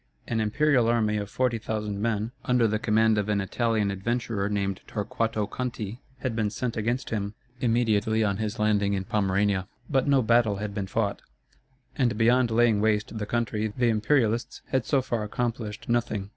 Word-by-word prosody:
An 115 - -1
imperial 125 +3 +2
army 110 -2 +2
of 100 -1 -4
forty 125 -1 0
thousand 105 -2 -3
men, 110 0 -1
under 125 -2 +3
the 110 0 0
command 110 0 +3
of 105 0 -2
an 105 -1 +2
Italian 110 +1 0
adventurer 105 0 -2
named 100 -2 -1
Torquato 110 0 -1
Conti, 115 -1 -5 0.2
had 130 -4 -2
been 110 -2 +1
sent 120 +2 -3
against 120 +4 -2
him, 105 -1 -2 0.2
immediately 110 -2 +2
on 100 -2 0
his 110 -1 -3
landing 105 -2 +2
in 95 -1 -1
Pomerania, 100 -2 +1 0.2
but 135 0 +2
no 135 -2 +4
battle 115 -2 +3
had 105 0 -4
been 100 -2 -3
fought, 100 0 -1 0.7
and 120 -6 +1
beyond 120 +2 +4
laying 115 -2 +3
waste 110 0 +1
the 105 - -3
country 110 -2 -1
the 120 -1 +3
Imperialists 115 +1 +1
had 130 -2 0
so 135 -3 +2
far 120 -3 -2
accomplished 110 0 -3
nothing. 115 -4 -1
110 Hz, 170 wpm, -26 LUFS, 105-120 Hz, 0.7 s, no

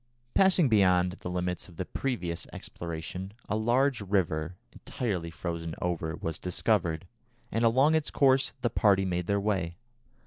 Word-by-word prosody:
Passing 190 -5 +5
beyond 90 -4 +3
the - - -5
limits 90 +1 -2
of 85 - -15
the 95 - -3
previous 90 -11 -3
exploration, 85 +3 -6
a 105 - -1
large 120 +3 +2
river, 90 -4 0 0.2
entirely 95 -9 -3
frozen 85 0 -4
over, 85 -2 -2
was 80 -1 -4
discovered, 90 -3 0 0.5
and 115 - 0
along 130 +7 +4
its 160 -2 +1
course 135 -1 +3
the 120 -2 0
party 100 -4 +3
made 90 -1 -2
their 100 0 +2
way. 95 -5 -1
95 Hz, 145 wpm, -29 LUFS, 85-115 Hz, 0.5 s, Passing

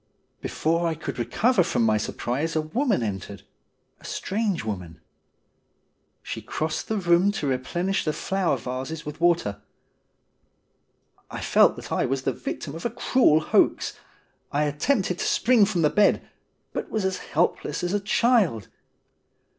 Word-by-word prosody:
Before 165 +2 0
I 165 - -1
could 155 -5 -6
recover 190 - +2
from 165 - +1
my 110 -1 +3
surprise 135 +9 -2
a 155 - +2
woman 205 - 0
entered 95 -4 -5 0.3
— - - -46
a - - -22
strange 200 - -2
woman. 90 -6 -5 1.2
She - - -5
crossed 155 +1 -3
the 220 - -1
room 175 +1 +3
to 155 - -3
replenish 170 +9 -1
the 155 - 0
flower 190 +2 0
vases 135 +6 -5
with 150 +2 -7
water. 165 -13 +2 1.7
I - - -6
felt - - +4
that - - -10
I - - +1
was 135 +1 -2
the 135 - 0
victim 140 - -5
of 165 - -7
a - - 0
cruel 225 -8 +3
hoax. - - +2 0.6
I 145 +1 +1
attempted 180 - 0
to - - -1
spring 235 -3 +4
from 190 -5 0
the 150 - +4
bed, 210 0 +3 0.5
but - - -4
was 215 -3 -1
as 190 -1 -1
helpless 155 -1 -1
as 175 +2 -1
a 205 - +2
child. 205 - +2
165 Hz, 155 wpm, -25 LUFS, 135-195 Hz, 1.7 s, felt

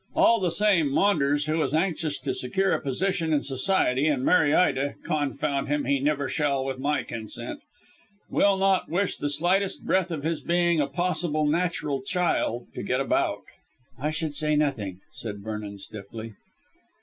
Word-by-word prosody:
All 230 0 +5
the 185 -2 +1
same, 170 -4 +3
Maunders, 145 -5 +2
who 155 +1 0
is 140 0 0
anxious 160 -3 0
to 130 0 -2
secure 190 +10 0
a - - 0
position 165 +4 -1
in 150 -2 +2
Society 135 -1 +1
and 140 -4 +1
marry 160 -5 +4
Ida 140 -4 +2
confound 140 -1 -1
him, 145 +1 0
he 140 +1 +2
never 145 0 0
shall 140 -3 0
with 135 -1 -4
my 145 +2 0
consent 110 -2 -7 0.7
will 200 -1 +3
not 190 -1 +2
wish 185 +4 0
the 145 - -2
slightest 180 +7 +1
breath 190 -1 +2
of 155 -4 -4
his 160 -1 -1
being 170 +1 +2
a 140 - 0
possible 170 -1 0
natural 150 -3 0
child 150 -7 0
to - - -5
get - - 0
about." - - 0 0.6
"I 150 +3 -1
should 155 -1 -3
say 150 +1 +1
nothing," 110 -11 -1
said 105 -3 -7
Vernon 105 -2 -5
stiffly. 110 +2 -9
150 Hz, 165 wpm, -26 LUFS, 135-175 Hz, 0.7 s, All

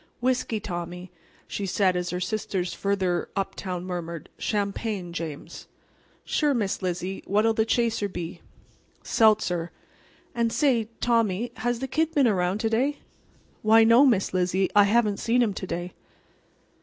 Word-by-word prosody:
"Whiskey, 250 -3 0
Tommy," 180 -1 -6 0.4
she 200 - -4
said 185 0 +2
as 180 0 -2
her 180 - -2
sisters 185 -2 -2
further 190 -3 -1
uptown 185 -2 -3
murmur, 170 -3 -5 0.2
"Champagne, 200 -3 -2
James." 160 -4 -7 0.6
"Sure, 295 -3 +1
Miss 205 -5 -1
Lizzie. 185 +1 -3
What'll 215 +3 +3
the 220 0 +1
chaser 225 -3 +1
be?" 175 -2 -6 0.6
"Seltzer. 205 -6 +2 0.6
And 235 -1 0
say, 235 -5 +2
Tommy, 230 -1 +1
has 240 +1 -1
the 265 - -2
Kid 320 +5 0
been 280 -4 +5
around 185 -2 +1
to 225 - +1
day?" 270 +6 +1 0.6
"Why, 220 +1 +6
no, 230 +4 +6
Miss 230 -11 +2
Lizzie, 185 +1 +1
I 205 -1 +7
haven't 210 -1 +2
saw 230 - -2
him 240 -4 +3
to 190 - -6
day." 175 +1 -4
205 Hz, 145 wpm, -26 LUFS, 180-230 Hz, 0.6 s, I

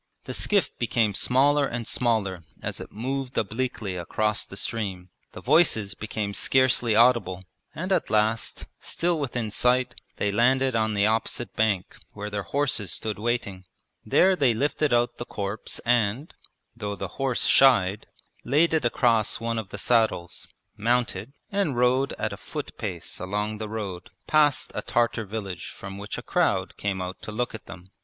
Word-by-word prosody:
The - - -6
skiff 205 -2 +1
became 115 -3 +1
smaller 140 +6 +3
and 120 -2 -4
smaller 110 -6 0 0.2
as - - -4
it - - -9
moved 130 +3 -4
obliquely 110 -3 -2
across 105 +5 -1
the - - -9
stream, 95 -6 -3 0.2
the - - -9
voices 110 - +4
became 105 -1 -4
scarcely 130 -2 +3
audible, 115 -6 +3 0.3
and 185 +5 -4
at - - +1
last, 110 +1 0
still 170 -1 -1
within 120 -6 -2
sight, 125 +4 +2 0.2
they 100 - 0
landed 130 +4 +3
on 110 -1 +1
the 100 0 +3
opposite 115 +2 -1
bank 105 -4 0 0.2
where 105 0 -6
their 100 0 -2
horses 110 -1 -1
stood 110 -2 -3
waiting. 110 -5 -2 0.4
There 190 +1 +4
they 135 -9 +3
lifted 145 +3 0
out 120 0 +1
the - - -2
corpse 100 -1 -4
and 120 +4 +1 0.4
(though 105 -3 -4
the 95 -1 -5
horse 135 -2 +2
shied) 105 -7 +4 0.4
laid 155 +6 +3
it 155 -5 +1
across 115 -3 +2
one 115 0 -1
of 105 -4 -7
the 105 - -7
saddles, 110 -5 +1 0.3
mounted, 115 -1 0 0.2
and 195 -11 0
rode 125 +2 +2
at - - -3
a - - -7
foot - - -7
pace - - -5
along 105 +3 -2
the 110 -1 -4
road 100 -5 -5 0.2
past 150 -3 +3
a - - -2
Tartar 115 -2 0
village 100 -4 -5
from 95 +1 -8
which 100 - -5
a - - -6
crowd - - 0
came 95 -2 -2
out 90 +1 -7
to - - -6
look 120 +3 -2
at 110 - -9
them. 90 +1 -11
115 Hz, 165 wpm, -26 LUFS, 100-125 Hz, 0.4 s, voices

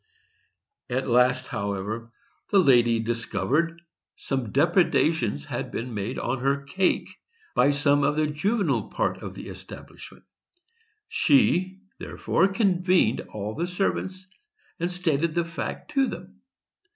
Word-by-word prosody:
At 130 +2 -1
last, 125 +1 +3
however, 100 +3 -4 0.4
the 205 - +3
lady 120 -9 +5
discovered 115 - 0
that 170 - -21 0.4
some 130 -6 -3
depredations 165 - +2
had - - -4
been 120 +1 -4
made 105 +4 -3
on 120 +2 -2
her 140 +2 0
cake 185 +7 0 0.5
by - - +4
some 145 0 +3
of 145 - +2
the 155 0 +2
juvenile 195 +9 0
part - - -1
of - - -7
the - - -8
establishment; - - -11 0.8
she, 190 - +2 0.2
therefore, 190 - +1
convened 185 - +2
all 105 0 -4
the 170 +7 -2
servants 185 0 -2 0.5
and 175 +2 -1
stated 170 -3 0
the 170 -1 +1
fact 170 - -6
to 275 -2 +2
them. - - -9
150 Hz, 125 wpm, -26 LUFS, 120-180 Hz, 0.8 s, lady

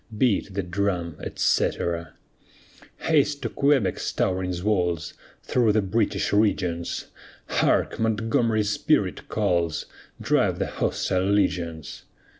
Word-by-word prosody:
Beat 105 -5 +1
the 100 - -1
drum, 90 -2 -2
etc. 85 -2 0 0.9
Haste 150 -2 +2
to - - -1
Quebec's 140 -8 +1
towering 90 0 0
walls, 90 -7 0 0.3
Through 115 -4 +2
the 110 -1 +2
British 100 0 0
regions; 90 -5 0 0.4
Hark! - - +1
Montgomery's 110 -1 +1
spirit - - 0
calls, 85 -3 0 0.3
Drive - - +1
the - - -1
hostile 95 0 -1
legions. 85 -6 -1
100 Hz, 100 wpm, -25 LUFS, 85-110 Hz, 0.9 s, Haste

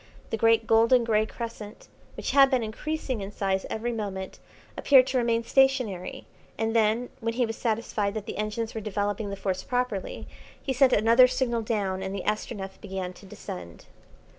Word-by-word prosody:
The - - +1
great 225 0 +3
golden 230 +2 +4
grey 215 -1 +2
crescent, 230 -2 -8 0.3
which - - -2
had 275 -1 +6
been 255 -3 +1
increasing 255 +1 -3
in 195 +1 -6
size 195 -1 -1
every 235 +2 -2
moment, 200 -4 -5 0.4
appeared 265 -3 +6
to 260 -1 0
remain 235 -1 +1
stationary, 250 -9 +1 0.3
and 225 0 -1
then, 225 +2 +2
when 230 0 -2
he 245 0 +2
was 225 0 -4
satisfied 215 -3 -1
that 215 -2 -4
the - - -6
engines 215 +2 -3
were 220 - -4
developing 205 0 -2
the 200 - -4
Force 190 -1 -2
properly, 245 -6 -3 0.3
he 265 - -2
sent 260 0 +4
another 230 +4 +6
signal 250 -2 0
down, 200 -4 -1
and 190 +1 -4
the 195 - -4
Astronef 195 -2 -3
began 190 -2 -5
to 195 - -15
descend. 85 - -9
225 Hz, 175 wpm, -27 LUFS, 200-240 Hz, 0.4 s, had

